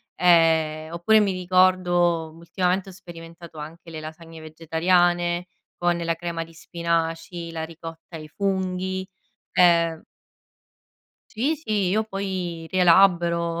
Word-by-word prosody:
ehm, 160 -2 +3
oppure 215 +6 +4
mi 200 -2 +1
ricordo 180 -2 +2
ultimamente 180 +3 -2
ho - - -10
sperimentato 170 -3 -12
anche 160 +3 -10
le 160 -1 -7
lasagne 160 +1 -10
vegetariane, 175 +2 +1 0.3
con 175 0 +2
la 170 -1 -1
crema 165 0 -4
di 165 - -16
spinaci, 170 0 -3
la 160 -1 -5
ricotta 165 +1 -10
ai 155 -1 -8
funghi, 190 +1 -2 0.5
ehm 170 -2 +3 1.3
Sì, 270 +8 0
sì, 215 - -1
io 215 +3 +1
poi 185 -5 -4
rielaboro 170 -2 +3
170 Hz, 115 wpm, -24 LUFS, 165-185 Hz, 1.3 s, oppure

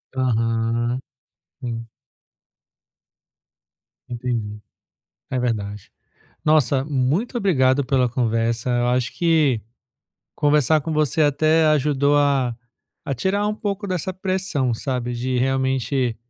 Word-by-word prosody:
Aham, 115 -1 0 0.6
hum. 115 -2 -5 2.2
Entendi, 115 -4 -3 0.7
é 130 - -1
verdade. 105 -4 -3 0.6
Nossa, 140 -3 +3
muito 150 - 0
obrigado 140 - +2
pela 130 -1 +2
conversa, 115 0 0
eu 120 0 +1
acho 125 0 0
que 155 -9 +2 0.7
conversar 150 0 +3
com 160 +3 -4
você 155 0 +1
até 155 +2 +3
ajudou 145 -1 +2
a 135 -5 +2 0.5
a 140 - -3
tirar 200 - 0
um 210 - -1
pouco 205 -1 -3
dessa 185 0 -2
pressão, 185 -9 -1
sabe? 125 -1 -3
De 125 +1 -1
realmente 130 -1 0
130 Hz, 105 wpm, -22 LUFS, 120-155 Hz, 2.2 s, Nossa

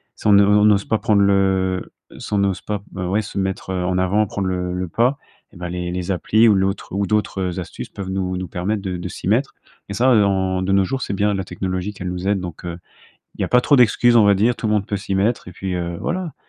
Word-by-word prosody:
si - - -15
on - - +6
ne 100 0 +7
on 105 +1 +4
n'ose 100 -2 +4
pas 110 - +1
prendre 105 -1 +2
le 95 -2 +1 0.3
si - - -7
on 100 - +2
n'ose 95 -2 0
pas, 105 -2 -4
heu, 95 - -3
ouais, 100 +4 +1
se 105 - -8
mettre 95 -1 -2
en 90 0 -1
avant, 100 +4 +2
prendre 100 -1 -3
le 90 -1 -2
le 90 0 -3
pas 120 - +1 0.4
et - - -18
ben 90 0 -5
les 90 0 -4
les 90 +1 -3
applis 110 +6 +3
ou - - +5
l'autre 95 +1 -1
ou 100 +1 -1
d'autres, 105 -2 0
heu, 90 0 -2
astuces 90 - -7
peuvent 95 -1 -7
nous 95 -1 -2
nous 95 -1 -4
permettre 100 +4 -2
de 90 -2 -3
de 90 - -5
s'y 90 - -7
mettre 125 +7 +1 0.3
et - - -4
ça, 125 +6 +3
heu, 105 - +5
en 95 -1 0
de 95 - -1
nos 95 0 +4
jours, 135 +8 -3
c'est 100 - -3
bien 105 +1 +1
la 95 - -2
technologie 95 +2 -4
qu'elle 90 -2 -5
nous 90 +1 -4
aide, 100 -1 +2
donc 85 -1 -8
heu, 85 -1 -5 0.6
il - - -13
y - - +2
a - - -3
pas 125 - +4
trop 145 - +3
d'excuses 120 0 +4
on 110 - +6
va 100 - +5
dire. 110 +5 +2
Tout - - -4
le 105 - +1
monde 100 -1 0
peut 100 - -2
s'y 100 0 -4
mettre, 100 +2 0
et 90 - -10
puis, 95 +1 -5
heu, 85 -1 -3
voilà. 170 -3 -3
95 Hz, 275 wpm, -20 LUFS, 90-105 Hz, 0.6 s, ne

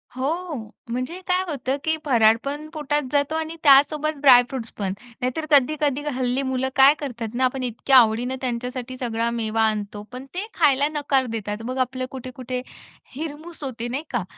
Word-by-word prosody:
हो, 315 +5 -2 0.3
म्हणजे 255 +9 -3
काय 365 0 +2
होतं, 275 -2 -2
की 315 0 +1
फराळ 225 -5 +5
पण 290 +2 -4
पोटात 295 -1 -1
जातो 285 +2 +1
आणि 320 0 -3
त्यासोबत 300 +2 +5
ड्राय 255 -4 +8
फ्रुट्स 245 -4 -6
पण 195 -2 -2 0.3
नाहीतर 255 +6 -2
कधी-कधी 290 0 +3
हल्ली 255 +1 0
मुलं 260 0 0
काय 270 +2 +8
करतात 240 -5 -5
ना 260 +1 +2
आपण 255 +1 -1
इतक्या 250 +2 +3
आवडीने 240 +2 +3
त्यांच्यासाठी 250 0 -4
सगळा 235 -2 -1
मेवा 225 -1 -1
आणतो 210 -1 -4
पण 250 +2 -8
ते 380 +3 -2
खायला 280 +1 +3
नकार 280 -3 +1
देतात 210 0 -4
मग 255 +2 -4
आपलं 255 0 -4
कुठे-कुठे 255 -1 -5 0.5
हिरमूस 310 +2 -7
होते 240 -3 -4
नाही 265 +5 -3
का. 240 -5 -1
260 Hz, 165 wpm, -23 LUFS, 240-290 Hz, 0.5 s, ड्राय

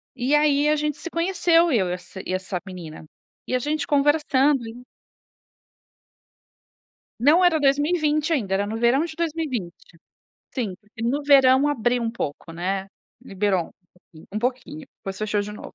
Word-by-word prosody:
E 260 +4 +1
aí, 295 -1 +3
a 305 - +3
gente 300 -1 -2
se 340 - -6
conheceu 340 -1 +2
eu 190 -7 +2
e - - -1
essa 180 +1 -8
e 185 - -3
essa 185 -1 -3
menina. 170 -4 -9 0.4
E 255 - -1
a - - +2
gente 295 +2 -2
conversando 285 -3 +2
e 240 +2 -10 2.4
Não 310 +9 +5
era 330 -3 +4
2020 300 +2 +1
ainda, 205 -10 -1
era 200 +1 0
no 220 +1 -4
verão 240 +6 +3
de 315 -2 -8
2020. 280 - -4 0.6
Sim, 225 -8 -2
porque 210 +1 -12
no 270 +5 0
verão 275 0 +5
abriu 245 -3 0
um 230 - -1
pouco 165 - -6
né. 190 +3 -3 0.4
Liberou, 195 -5 -1 0.6
um 215 - -2
pouquinho, 260 +5 -4 0.2
depois 195 -2 -6
fechou 215 -1 -1
de 210 +1 -5
novo. 210 - -10
255 Hz, 155 wpm, -23 LUFS, 205-295 Hz, 2.4 s, Não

